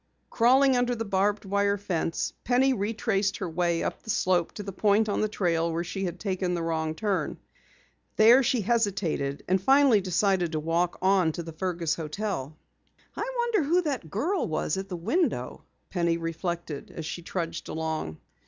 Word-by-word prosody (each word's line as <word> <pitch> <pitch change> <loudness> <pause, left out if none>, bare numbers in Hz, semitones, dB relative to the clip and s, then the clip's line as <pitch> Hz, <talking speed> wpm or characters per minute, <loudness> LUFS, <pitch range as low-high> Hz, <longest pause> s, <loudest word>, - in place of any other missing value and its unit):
Crawling 260 +3 +4
under 245 0 +1
the 225 0 -3
barbed 200 +1 0
wire 200 +1 +1
fence, 175 -4 -2
Penny 260 +2 +3
retraced 205 -2 0
her 185 - -3
way 170 0 0
up - - -3
the - - -13
slope 180 -4 +1
to 205 - -6
the 195 - -5
point 210 +3 +2
on 205 - 0
the 215 - +2
trail 170 -5 0
where 165 +1 -1
she 195 +2 -4
had 175 0 -5
taken 185 -2 -1
the 170 - -2
wrong 160 -1 -1
turn. 205 0 -1 0.8
There 235 +5 +7
she 245 -2 +1
hesitated 195 -10 0
and 185 +1 +2
finally 265 -2 +5
decided 185 -2 +1
to 155 - 0
walk 165 +3 0
on 190 -4 +4
to 170 - -5
the 165 0 -8
Fergus 170 -1 -1
hotel. 155 -3 -4 0.6
"I - - -3
wonder 475 -5 +2
who 340 +5 +2
that 265 - -3
girl 325 - -1
was 155 -1 -1
at 190 +1 -5
the 180 - -4
window?" 225 - -1 0.3
Penny 170 -2 +1
reflected 165 -2 -4
as 165 - -7
she 175 - -5
trudged 170 -1 -4
along. 160 - -3
190 Hz, 175 wpm, -27 LUFS, 165-220 Hz, 0.8 s, There